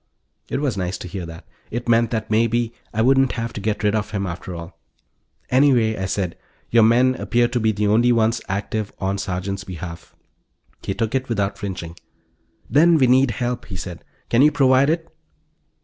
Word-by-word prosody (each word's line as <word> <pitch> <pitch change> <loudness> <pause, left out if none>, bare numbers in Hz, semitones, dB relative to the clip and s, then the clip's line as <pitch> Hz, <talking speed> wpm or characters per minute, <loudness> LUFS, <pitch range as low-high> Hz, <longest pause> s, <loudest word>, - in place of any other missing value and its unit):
It - - -2
was 130 -9 -1
nice 90 -1 -2
to 90 - -8
hear 90 -1 -6
that; 80 0 -10 0.2
it 120 +2 -4
meant 115 -1 +3
that, 110 -1 -3
maybe, 115 +1 +1 0.2
I 110 -1 0
wouldn't 135 +1 +4
have 115 -1 -4
to 105 - -6
get 105 +1 -2
rid 105 -1 +2
of 105 -2 -1
him 100 -2 -2
after 90 0 -6
all. 85 0 -9 0.7
"Anyway," 125 -4 +4
I 95 - -3
said, 95 -2 -2 0.4
"your 115 - +5
men 120 +4 +4
appear 120 -1 +1
to 120 0 -1
be 110 -1 +2
the 105 0 -1
only 115 +4 +4
ones 115 0 +2
active 100 +1 -2
on 95 0 -2
Sergeant's 95 +1 -3
behalf." 85 -2 -8 0.7
He 95 - -3
took 115 -1 -2
it 130 -1 -1
without 100 -3 -1
flinching. 85 -4 -5 0.7
"Then 165 +3 +5
we 135 - +4
need 130 +1 +4
help," 120 +2 -3
he 95 - -7
said. 90 -2 -7 0.3
"Can 120 - +4
you 150 +2 +6
provide 135 -1 +4
it?" 165 +1 -1
110 Hz, 190 wpm, -21 LUFS, 95-120 Hz, 0.7 s, you